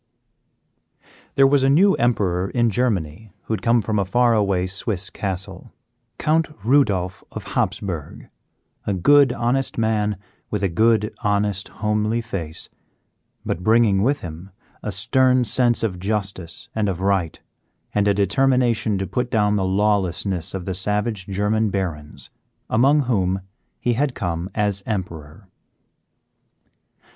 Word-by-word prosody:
There 135 - +6
was 140 0 +4
a 135 - +4
new 190 +8 +5
emperor 95 -6 0
in 120 -2 +1
Germany 105 -5 -1
who - - -3
had 110 - -2
come 115 -1 +3
from 105 0 0
a - - +2
far 120 +5 +2
away 100 -4 +1
Swiss 100 0 -3
castle; 95 +1 -4 0.5
Count 160 +1 +1 0.2
Rudolph 100 -9 +2
of - - -7
Hapsburg, 85 -7 -3 0.6
a 100 - +1
good, 140 +8 +5
honest 125 +3 -1
man 105 -2 0 0.3
with 105 -1 -2
a 95 - +2
good, 110 +4 +2
honest, 105 -2 0
homely 105 +1 -1
face, 95 -9 -4 0.8
but 85 - -2
bringing 110 -1 +3
with 140 +7 +1
him 85 +3 -8 0.3
a 105 - -4
stern 130 +6 +2
sense 120 -1 +1
of 95 -5 -2
justice 100 -4 -4
and 105 -2 0
of 90 -2 -3
right, 95 -4 0 0.5
and 105 0 +2
a 100 - +4
determination 115 +1 +2
to 95 - -2
put 120 +7 -2
down 105 -2 +2
the 100 - 0
lawlessness 95 -3 0
of 90 -2 -5
the 95 - -2
savage 105 +1 -2
German 105 +3 0
barons 85 -7 -4 0.4
among 135 +7 +4
whom 95 -7 0 0.4
he 120 - +1
had 135 +2 0
come 85 +1 -3
as 105 -2 0
Emperor. 85 -3 -5
105 Hz, 135 wpm, -22 LUFS, 95-120 Hz, 0.8 s, There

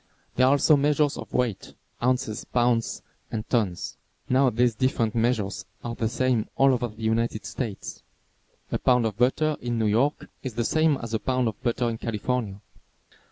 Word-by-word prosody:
There 130 +1 +4
are 135 - +5
also 145 +2 +5
measures 145 0 +2
of - - -8
weight, 125 -5 -2 0.3
ounces, 125 -3 0
pounds 120 -2 0 0.3
and 110 -1 -4
tons. 105 -8 -1 0.3
Now 130 +1 +4
these 120 +1 +2
different 115 -2 0
measures 115 -4 0 0.2
are 120 - -3
the 115 -1 -1
same 125 -2 +1
all 135 0 +5
over 120 -1 0
the 110 0 -11
United 110 -1 0
States. 105 0 -5 0.7
A - - 0
pound 125 -2 +3
of 110 -3 -1
butter 140 +6 +2
in 120 -1 -2
New 110 - +1
York 120 +8 +1
is 130 -5 -5
the 120 -1 0
same 155 0 +3
as 115 -1 -5
a 110 - +1
pound 130 0 0
of 105 - -10
butter 120 0 0
in 115 -1 -3
California. 115 -2 -2
120 Hz, 175 wpm, -26 LUFS, 110-130 Hz, 0.7 s, are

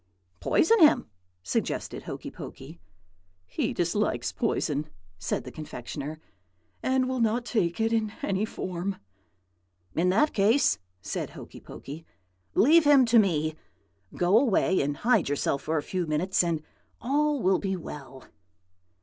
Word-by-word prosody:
"'Poison 375 - +3
him,' 305 - +5 0.3
suggested 85 - -2
Hokey - - -7
Pokey. 85 - -10 0.7
"'He 90 - -2
dislikes 180 +5 0
poison,' 155 - -1 0.3
said - - -2
the - - -9
confectioner, 150 +1 -7 0.6
'and 260 0 +1
will 260 0 -2
not 230 +1 +1
take 175 -8 0
it 225 +1 +1
in 220 -2 +1
any 195 +1 0
form.' 185 -2 -3 1.0
"'In 175 +3 +2
that 300 +12 +3
case,' 220 +7 +3 0.2
said - - -3
Hokey - - -11
Pokey, 150 +4 -9 0.5
'leave 315 +7 +6
him 285 -3 +6
to 235 0 +5
me. 160 -6 +1 0.6
Go 180 +5 +4
away, 205 -7 +2
and 145 0 -2
hide 245 - +2
yourself 140 -1 0
for 160 +3 -1
a 145 - -1
few 180 -3 -3
minutes, 175 +5 +1
and 165 -3 -1 0.4
all 290 +3 +1
will 190 -3 +2
be 195 -1 -2
well.' 140 -6 -9
190 Hz, 135 wpm, -27 LUFS, 155-235 Hz, 1.0 s, leave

